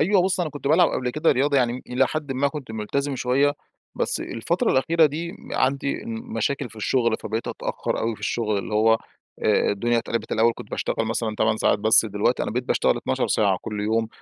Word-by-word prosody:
أيوه، 185 +4 +4
بُص 190 0 +1
أنا 165 -3 -1
كنت 145 -1 -4
بالعب 165 +3 +5
قبل 125 -1 -2
كده 155 +6 +2
رياضة، 140 +2 +1
يعني 125 0 +1
إلى 125 +1 +2
حدٍ 150 0 -3
ما 140 +2 +1
كنت 135 -5 -8
مُلتزم 135 +6 -2
شوية، 135 +4 +2 0.4
بس - - -1
الفترة - - -1
الأخيرة 160 +4 +4
دي 165 +4 -4
م - - -13
عندي 140 +1 0
مشاكل 225 - -3
في - - -15
الشُغل، 115 +1 +1
فبقيت 110 +2 -3
أتأخر - - -3
أوي 115 0 -1
في - - -16
الشُغل 110 -3 -1
اللي 100 +2 -5
هو 110 +1 +5 0.5
آآ - - +3
الدنيا 120 +4 +1
اتقلبت، 115 0 -3
الأول 115 +1 +3
كنت - - -10
باشتغل 115 - -1
مثلًا 110 -1 -1
8 110 0 +2
ساعات، 110 - +2
بس 110 +2 +5
دلوقتي 105 +3 0
أنا - - -2
بقيت 125 +3 -2
باشتغل - - +2
12 - - -1
ساعة 100 -3 +2
كُلّ 105 -1 -4
يوم، 110 +2 0
125 Hz, 205 wpm, -24 LUFS, 110-145 Hz, 0.5 s, بالعب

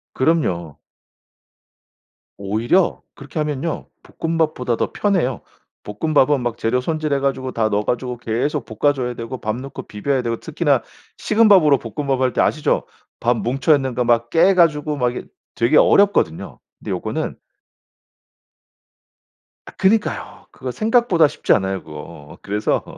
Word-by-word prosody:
그럼요. 90 - 0 1.6
오히려 110 - +1
그렇게 145 +2 -7
하면요. 150 +1 -3 0.3
볶음밥보다 155 -7 0
더 - - -1
편해요. 175 - 0 0.4
볶음밥은 145 +5 +1
막 120 -1 -3
재료 120 +3 0
손질해 155 +1 -1
가지고 135 -1 -2
다 110 -3 0
넣어 105 0 0
가지고 125 0 -2
계속 120 +4 -2
볶아 145 +7 +1
줘야 125 -3 -3
되고 115 +2 -6
밥 110 0 -2
넣고 135 0 -8
비벼야 130 +6 -1
되고 115 -2 -3
특히나 - - 0 0.3
식은 220 +1 +3
밥으로 155 -8 +6
볶음밥 135 +4 -3
할 130 -1 +1
때 - - +1
아시죠? 155 - +1 0.3
밥 120 +1 +1
뭉쳐 135 +6 +2
있는 135 -3 -2
거 125 - +1
막 120 0 +2
깨 170 +7 +4
가지고 150 -4 +2
막 125 -2 +1
이게 - - -6 0.3
되게 120 +6 +3
어렵거든요. 200 0 +3 0.2
근데 - - -6
요거는 - - -3 2.3
아 - - -10
그니까요. 210 +2 0
그거 130 -1 -6
생각보다 215 - +3
쉽지 145 - +1
않아요, 95 -1 -1
그거. 75 -1 -11
그래서 105 +1 -1
130 Hz, 310 characters per minute, -20 LUFS, 115-155 Hz, 2.3 s, 밥으로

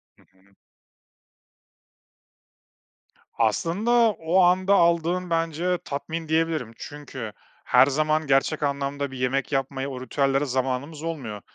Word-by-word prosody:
Hı - - -26
hı. 95 +1 -30 2.8
Aslında, 165 - 0 0.3
o 165 +4 +2
anda 185 +2 +4
aldığın 170 0 +2
bence 165 +2 0
tatmin 155 +3 -4
diyebilirim. 160 -7 0
Çünkü 130 -7 -8 0.3
her - - +6
zaman 155 +2 0
gerçek 135 +3 +2
anlamda 140 0 -2
bir 130 - -8
yemek 130 +3 -1
yapmaya, 135 0 -2
o 130 -1 -6
ritüellere 135 +1 0
zamanımız 135 +4 -2
olmuyor. 130 -11 -5
145 Hz, 110 wpm, -25 LUFS, 130-165 Hz, 2.8 s, her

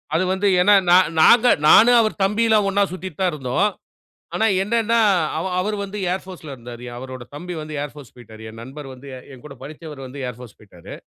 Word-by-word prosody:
அது 170 - +2
வந்து 195 +2 0
ஏன்னா, 205 +2 +5 0.2
நா - - +8 0.3
நாங்க 240 +8 +6 0.2
நானும் 240 +6 +7
அவர் 215 -1 -2
தம்பிலாம் 210 0 +2
ஒண்ணா 200 +1 +2
சுத்திட்டு 185 -3 -8
தான் 185 -2 +2
இருந்தோம். 140 +8 0 0.7
ஆனா, 220 - +1 0.2
என்னன்னா 230 +2 +1 0.4
அவ 165 - -3
அவரு 210 +3 -2
வந்து 200 +1 -7
ஏர் 190 - -3
போர்ஸ்ல 170 -6 -10
இருந்தாரு. 120 0 -11
அவரோட 130 0 -8
தம்பி 180 +4 -7
வந்து 155 0 -8
ஏர் 145 - -8
போர்ஸ் 145 -4 -13
போய்ட்டாரு. 110 -2 -13
என் 115 +1 -11
நண்பர் 135 +3 -10
வந்து 130 +2 -14 0.3
என்கூட 140 +2 -13
படிச்சவரு 150 0 -10
வந்து 135 +2 -9
ஏர் 125 -1 -7
போர்ஸ் 120 -4 -13
போய்ட்டாரு. 90 -5 -13
155 Hz, 190 wpm, -21 LUFS, 130-205 Hz, 0.7 s, நா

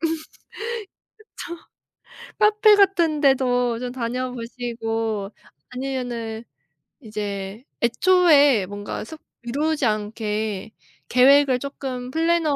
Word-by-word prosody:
그쵸. 325 0 0 2.2
카페 425 0 +5
같은 345 -6 +3
데도 250 -4 +2
좀 250 0 -5
다녀 250 +1 -3
보시고 225 -3 -3 0.4
아니면은 245 -4 -4 0.6
이제 205 -2 -5 0.2
애초에 290 - +4
뭔가 205 +2 -6
습 310 +8 -10 0.2
미루지 290 +4 -1
않게 215 -1 -2 0.4
계획을 265 +1 +5
쪼끔 260 -2 -6
플래너에 325 -2 +1
250 Hz, 190 characters per minute, -23 LUFS, 225-290 Hz, 2.2 s, 카페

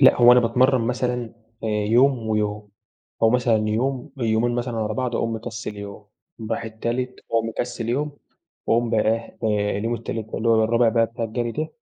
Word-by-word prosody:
لأ، 130 - +7
هو 120 0 +8
أنا 125 - +6
باتمرّن 125 +2 +3
مثلًا 125 +1 -1 0.4
آآ - - 0
يوم 110 +3 +2
ويوم 105 -1 -1 0.5
أو 110 - +6
مثلًا 115 -4 +2
يوم 130 +5 -1
يومين 115 0 +1
مثلًا 120 -1 -2
ورا 110 0 -1
بعْض 125 +1 -2
وأقوم 115 0 -1
مكسّل 110 -1 -6
يوم. 100 0 -8 0.4
أقوم 110 - -7
رايح 115 - -2
التالت 120 +3 -3
وأقوم 115 0 0
مكسّل 120 0 -4
يوم 145 +5 -1 0.5
وأقوم 115 0 +2
بقى 110 - +3
إيه، 115 +2 -1 0.4
آآ - - -1
اليوم 115 +3 -1
التالت 115 -1 -5
اللي 115 - -1
هو 110 -1 +4
الرابع 115 +1 +3
بقى 115 0 +3
بتاع 115 0 -5
الجَري 115 +1 -2
ده. 155 +1 -3
115 Hz, 190 wpm, -23 LUFS, 110-125 Hz, 0.5 s, هو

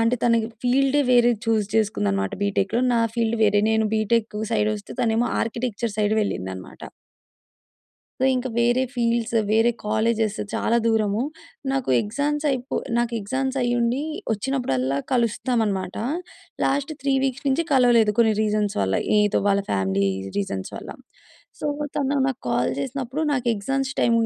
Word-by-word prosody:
అంటే, 230 +2 +2
తనకి 230 -2 +3 0.2
ఫీల్డే 275 +3 +3
వేరేది 240 -2 +4
చూజ్ 220 -3 +2
చేసుకుందనమాట 100 - 0
బీటెక్‌‌‌‌‌‌‌లో. 200 +4 +1
నా 230 - +3 0.2
ఫీల్డ్ 230 -1 0
వేరే. 205 -1 +3
నేను 220 0 +2
బీటెక్కూ 215 0 0
సైడొస్తే, 210 -1 -1
తనేమో 230 +1 +1
ఆర్కిటెక్చర్ 230 -1 -2
సైడు 210 +1 +2
వెళ్ళిందనమాట. 95 - -5 1.4
సో, - - +2
ఇంకా 255 0 -2
వేరే 240 +2 +3
ఫీల్డ్స్, 235 -1 0 0.2
వేరే 225 +2 +4 0.2
కాలేజేస్ 220 0 +1 0.2
చాలా 235 - +1
దూరము. 220 -1 +1 0.5
నాకు 270 - -1
ఎగ్జామ్స్ 290 +7 -2
అయిపో 255 -1 -2 0.2
నాకు 240 0 0
ఎగ్జామ్స్ 265 +6 -2
అయ్యుండి 240 +1 +1 0.3
వచ్చినప్పుడల్లా 195 - -1
కలుస్తాం 235 0 +1
అన్నమాట. 190 -3 -3 0.7
లాస్ట్ 280 +2 0
3 275 -1 +1
వీక్స్ 265 +1 -2
నుంచి 310 +5 +1
కలవలేదు 240 -5 +5
కొన్ని 225 -2 +5
రీజన్స్ 210 -1 0
వల్ల. 95 0 0 0.2
ఏదో 210 -1 +2
వాళ్ళ 200 0 +2
ఫ్యామిలీ 95 0 +1 0.3
రీజన్స్ 95 -1 -3
వల్ల. - - -8 0.7
సో, - - -2 0.3
తను 280 0 0
నాకు 265 - -4
కాల్ 120 +1 +1
చేసినప్పుడు, 265 +2 -4
నాకు 250 -2 -2
ఎగ్జామ్స్ 270 +5 -2
టైం 235 - +3
230 Hz, 135 wpm, -23 LUFS, 205-250 Hz, 1.4 s, కలవలేదు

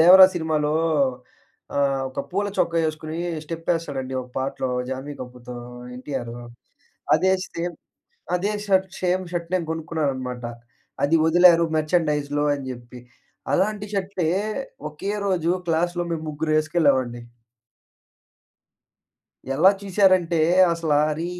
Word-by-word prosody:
'దేవరా' 185 +3 +10
సినిమాలో 155 -3 0 1.0
ఆహ్, 135 -1 +1
ఒక - - -10
పూల 205 +2 0
చొక్క 170 - +1
ఎసుకొని 155 +1 -6 0.3
స్టెపెస్తాడండి 160 -5 -3
ఒక 125 - -13
పాటలో 130 -1 -2 0.2
జాన్వి 135 +2 -5
కపూర్‌తో, 125 -1 -9 0.4
ఎన్‍టిఆర్. 125 -3 -5 0.8
అదే 190 0 +2
సేమ్ 170 +1 -4 0.6
అదే 200 +4 0 0.2
షర్ట్ 190 -1 +3
సేమ్ 185 0 +1
షర్ట్ 170 -1 -3
నేను 175 - -1
కొనుక్కున్నాను 160 -3 -1
అనమాట. 125 -1 -5 0.6
అది 145 +3 +4
వదిలారు 170 0 +6
మర్చండైజ్‌లో 150 -2 +1
అని 140 - -7
చెప్పి. 120 0 -10 0.5
అలాంటి 205 +5 +1
షట్లే 190 -4 -1 0.6
ఒకే 155 +7 -4 0.2
రోజు 175 -3 +1 0.2
క్లాస్‌లో 175 +2 +1
మేము 160 -1 -3
ముగ్గురం 155 +1 -1
వేసుకెళ్ళామండి. 140 -7 +1 2.3
ఎలా 185 +7 +6
చూసారంటే 185 -3 +3 0.3
అసల 165 -2 -1 0.2
"అరే 160 +3 -2
160 Hz, 110 wpm, -23 LUFS, 140-175 Hz, 2.3 s, దేవరా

